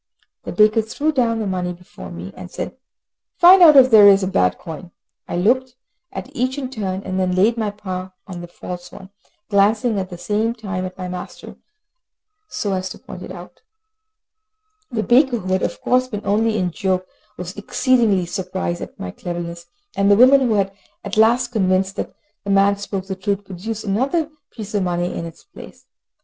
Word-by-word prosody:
The - - -4
baker 215 +1 +4
threw 285 +8 -1
down 240 -5 +1
the 220 - -2
money 180 -2 -2
before 175 - -12
me, 85 +3 -8
and 90 - -9
said, - - -6 0.6
"Find 365 +2 +8
out 315 -4 +9
if 260 -1 +7
there 210 -2 +9
is 195 -1 +6
a - - 0
bad 90 - +1
coin." 170 +1 -9 0.4
I - - -3
looked 250 +7 +1 0.4
at 275 +3 -8
each 255 +1 -1
in 260 -2 -4
turn, 195 -5 -3
and 185 0 -3
then 180 -1 0
laid 210 +5 +3
my 220 -3 -1
paw 185 -2 -6
on 180 -3 -8
the 175 - -8
false 175 +1 -8
one, 190 0 -12 0.4
glancing 210 +2 +2
at 185 -1 -4
the 175 - -8
same 215 +5 -1
time 195 -5 -4
at 185 - -8
my 185 -1 -5
master, 180 0 -8 0.9
so 200 -2 -2
as 185 0 -2
to - - -9
point 180 - -10
it - - -8
out. 180 -1 -11 1.3
The 220 -3 -2
baker, 250 +1 +4
who 185 -3 -3
had 185 - +1
of - - -2
course 255 0 +2
been 210 -5 -6
only 220 +2 +1
in 180 -3 0
joke, 185 +1 -1 0.3
was 180 +1 -6
exceedingly 210 -3 +2
surprised 180 -1 -3
at - - -9
my 90 - -5
cleverness, 170 - -6 0.3
and 200 0 +2
the 205 - +7
woman, 260 +3 +7
who 260 - +2
was 200 -4 +1 0.3
at 200 0 -4
last 235 +3 +4
convinced 190 -3 +1
that - - -4 0.3
the 200 - -6
man 200 0 +4
spoke 195 -1 -5
the 190 -1 -4
truth, 200 +1 -2
produced 210 +4 -6
another 270 - 0 0.2
piece 215 -2 -9
of 205 - +1
money 175 -1 -1
in 170 - -4
its 165 - -13
place. 400 - -14
200 Hz, 195 wpm, -20 LUFS, 185-225 Hz, 1.3 s, out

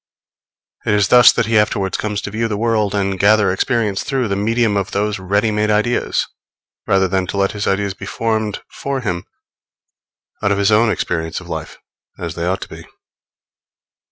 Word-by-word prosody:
It 105 - +1
is 105 -1 +2
thus 125 -2 +8
that - - +1
he 110 0 +3
afterwards 100 -2 0
comes 105 -1 -2
to 105 - -6
view 115 +2 -1
the 105 -2 -3
world 110 -2 0
and 95 -1 -1
gather 105 -1 +4
experience 105 0 0
through 135 -5 -1
the 100 - 0
medium 110 +1 +1
of 100 0 -1
those 105 -1 -1
ready 100 +4 +1
made 105 0 0
ideas, 110 +3 +1 0.6
rather 95 -1 +3
than 95 0 -1
to 100 - -4
let 100 0 +2
his 105 -2 -4
ideas 95 0 0
be - - -9
formed 110 -2 -2
for 140 -1 -4
him 90 -6 -3 1.2
out 100 - +1
of 100 - +1
his 100 +1 +2
own 110 +2 +4
experience 80 -5 -2
of - - -13
life, - - -6 0.4
as 85 -2 -5
they 85 0 -3
ought 95 +1 -1
to - - -7
be. - - -11
105 Hz, 185 wpm, -18 LUFS, 95-110 Hz, 1.2 s, thus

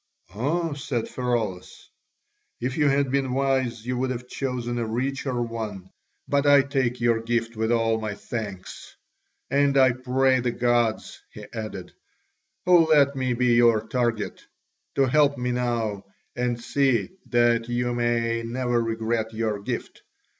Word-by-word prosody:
"Ah," 155 - -1
said 130 -5 -3
Pheraulas, 115 -8 -3 0.7
"if 125 +2 -2
you 150 -2 +3
had 140 -1 +1
been 135 -2 0
wise, 130 -4 0
you 125 0 -2
would 130 0 0
have 125 0 -5
chosen 125 -3 -3
a 115 - -1
richer 130 +2 -2
one; 110 -5 -5 0.4
but 140 0 +1
I 145 -1 +7
take 130 -3 -1
your 120 -1 +2
gift 115 0 -1
with 110 +1 -1
all 115 -1 +1
my 105 -2 -3
thanks. 100 -5 -7 0.6
And 140 0 +3
I 130 -1 +6
pray 130 +1 +2
the 125 0 0
gods," 120 -2 0
he - - -10
added, 105 -5 -6 0.7
"who 175 -3 +6
let 140 -2 +5
me 130 -2 0
be 125 0 +2
your 115 -2 +4
target, 120 -3 -1 0.5
to 135 - +4
help 145 +2 +3
me 125 0 -1
now 115 -5 -1 0.3
and 120 -1 -1
see 130 - +1 0.2
that 120 -1 +2
you 120 0 0
may 115 -1 0
never 120 +1 -1
regret 115 0 -1
your 110 -2 -1
gift. 100 - -5
120 Hz, 145 wpm, -25 LUFS, 115-130 Hz, 0.7 s, I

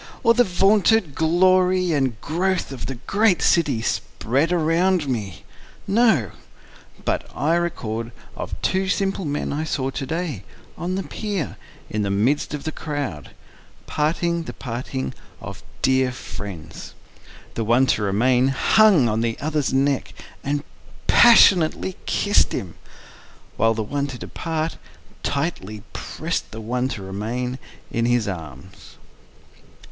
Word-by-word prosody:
Or 230 -1 +6
the 245 +1 +5
vaunted 195 - +3
glory 185 +3 +3
and 135 -7 0
growth 180 +2 -1
of 130 -4 -6
the 135 - -4
great 205 -5 +3
city 145 -9 +2
spread 140 +10 -1
around 170 0 +2
me?—No; 130 - -1 0.7
But - - -1
I 155 +3 +1
record 115 -10 -2 0.2
of - - -6
two 190 0 +1
simple 195 -2 0
men 145 -1 -2
I 150 +2 -2
saw 135 -4 -2
to 135 - -4
day, 160 - -3 0.3
on 180 +2 -3
the 195 - -2
pier, 200 -8 -4 0.3
in 105 - -2
the 100 - -1
midst 125 +10 +1
of 145 - -7
the 155 - -3
crowd, 145 - -5 0.5
parting 170 +2 0
the - - -6
parting 115 - -4 0.3
of - - -8 0.2
dear 130 0 +3
friends; 95 -9 -8 0.6
The 115 - -2
one 120 +4 +4
to - - -3
remain 120 +6 +3
hung 170 - +5
on 110 0 0
the 115 -1 -1
other's 150 -1 -1
neck, 135 0 0 0.3
and 145 +1 -1 0.4
passionately 190 -6 +6
kiss'd 205 0 +2
him, 90 -4 -4 0.8
While 115 0 +2
the 110 - -1
one 140 +6 -2
to 130 -3 -7
depart, 160 +4 -3 0.4
tightly 140 - -3
prest - - -4
the 110 - -8
one 125 +3 -1
to 110 -7 -5
remain 120 +7 -3 0.3
in 115 0 0
his 120 -2 +2
arms. 80 -2 -8
140 Hz, 130 wpm, -22 LUFS, 115-175 Hz, 0.8 s, Or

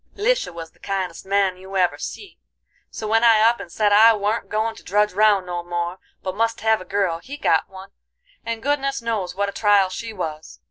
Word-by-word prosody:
"Lisha - - +1
was 165 -1 -9
the - - -30
kindest 190 -3 -4
man 195 -2 +1
you 190 +1 -6
ever 180 -1 +1
see, 400 - -8 0.5
so 215 - -6
when 225 +2 +2
I 225 -2 +6
up 230 +2 +4
and 170 - -9
said 205 +1 +2
I 220 +2 +7
warn't 210 +2 -2
goin' 220 +1 -1
to - - -12
drudge 210 +1 +1
round 205 -1 +3
no 175 -1 -4
more, 175 +1 -3 0.2
but 185 - -3
must 230 +1 0
hev 220 -1 +2
a - - -9
girl, 195 -5 -1
he 275 +11 -9
got - - +1
one, 190 +1 -12 0.5
and 230 -1 -4
goodness 275 -3 -1
knows 200 -6 -2
what 200 +1 0
a - - -5
trial 205 -2 +3
she 225 +5 -6
was. 160 -6 -6
205 Hz, 215 wpm, -22 LUFS, 185-225 Hz, 0.5 s, I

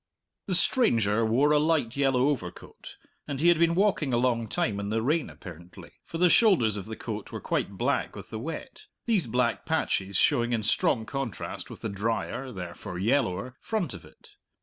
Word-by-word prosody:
The 185 - +1
stranger 115 - +3
wore 125 +7 +3
a 150 - +5
light 150 -6 +1
yellow 135 -1 +2
overcoat, 90 -12 -6 0.3
and 140 -2 -4
he 170 +3 +4
had 170 -2 +4
been 170 0 +3
walking 185 -9 +1
a - - +3
long 120 -2 +1
time 100 -1 -1
in 100 0 -4
the 110 +1 0
rain 150 +4 0
apparently, 85 -2 -12
for 165 - -6
the 180 +2 +5
shoulders 170 - +4
of 100 0 -6
the 110 - -6
coat 110 -2 -6
were - - -5
quite - - -2
black - - -1
with - - -10
the 110 - -4
wet, 165 - -7 0.2
these 205 - +1
black 120 +1 0
patches 100 - 0
showing 120 0 +3
in 110 -2 0
strong 110 +1 +1
contrast 135 -5 -5
with - - -11
the 110 - -3
dryer, 115 +6 -3
therefore 90 -3 -7
yellower, 120 +2 0
front 200 - -2
of 95 - -9
it. - - -18
120 Hz, 190 wpm, -27 LUFS, 110-155 Hz, 0.3 s, a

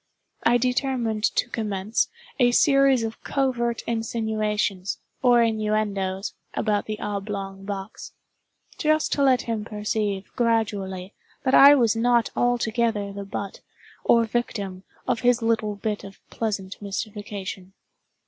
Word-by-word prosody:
I 240 +1 +4
determined 245 -3 0
to - - +1
commence 210 -2 -1 0.3
a 245 -1 +5
series 275 -3 +4
of 225 0 -5
covert 240 -4 0
insinuations, 215 -4 -1 0.2
or 245 -2 +5
innuendoes, 210 -3 -1 0.2
about 210 -2 0
the 215 -1 -4
oblong 195 -1 -4
box—just 215 - -4
to 285 - +1
let 260 -3 +4
him 225 -2 -2
perceive, 210 -2 -2
gradually, 205 -5 -1 0.3
that 265 -1 +1
I 285 +1 +9
was 235 -6 +3
not 235 0 +2
altogether 230 -4 0
the 200 0 -6
butt, 195 0 -5 0.4
or 235 -1 +5
victim, 205 -5 -3 0.3
of - - +1
his 245 -1 +2
little 225 -2 +1
bit 210 +1 -3
of 195 0 -11
pleasant 205 -4 -3
mystification. 200 -2 -5
220 Hz, 120 wpm, -24 LUFS, 200-235 Hz, 0.4 s, I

